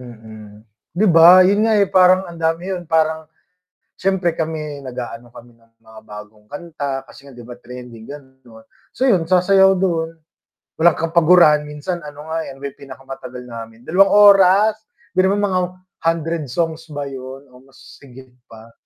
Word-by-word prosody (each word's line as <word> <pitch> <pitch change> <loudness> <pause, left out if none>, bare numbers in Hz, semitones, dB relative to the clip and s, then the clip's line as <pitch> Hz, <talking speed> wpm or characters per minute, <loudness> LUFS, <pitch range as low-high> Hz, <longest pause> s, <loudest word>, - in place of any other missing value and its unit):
Mm, 110 -3 -14 0.3
'di 215 +3 +2
ba 175 +2 +7
yun 205 +3 +2
nga 220 - +2
eh, 200 - +4
parang 185 0 +4
ang 170 -1 -11
dami 165 +4 -2
yun 175 -3 -7
parang, 160 -1 0 0.7
siyempre 185 -3 -1
kami 155 -2 -4
nag-aano 120 -2 -8
kami 120 +1 -14
ng 115 0 -32
mga 110 -1 -15
bagong 105 0 -13
kanta 145 -4 -6
kasi 140 +3 -17
nga 135 - -14
'di 120 - -12
ba 120 - -10
trending 125 -2 -12
ganon, 130 -5 -14 0.3
so - - -7
yun 180 -9 +2
sasayaw 190 +2 +4
dun, 165 -3 -2 0.7
walang 170 0 +4
kapagurahan 165 -2 +4
minsan 150 +4 -5
ano 150 +1 -11
nga 165 0 -2
eh, 135 - -9
may 140 +1 -7
pinakamatagal 135 -2 -11
namin, 115 0 -11
2 195 +4 +3 0.2
oras 200 +3 +3 0.3
biruin 190 +1 +1
mo 205 0 0
mga 185 - +1 0.5
100 165 -1 -1
songs 165 +4 -3
ba 145 -1 -5
yun 135 0 -9
o 125 - -17
mas 135 - -18
higit 130 -1 -16 0.2
pa. 115 +1 -15
150 Hz, 160 wpm, -18 LUFS, 125-175 Hz, 0.7 s, ba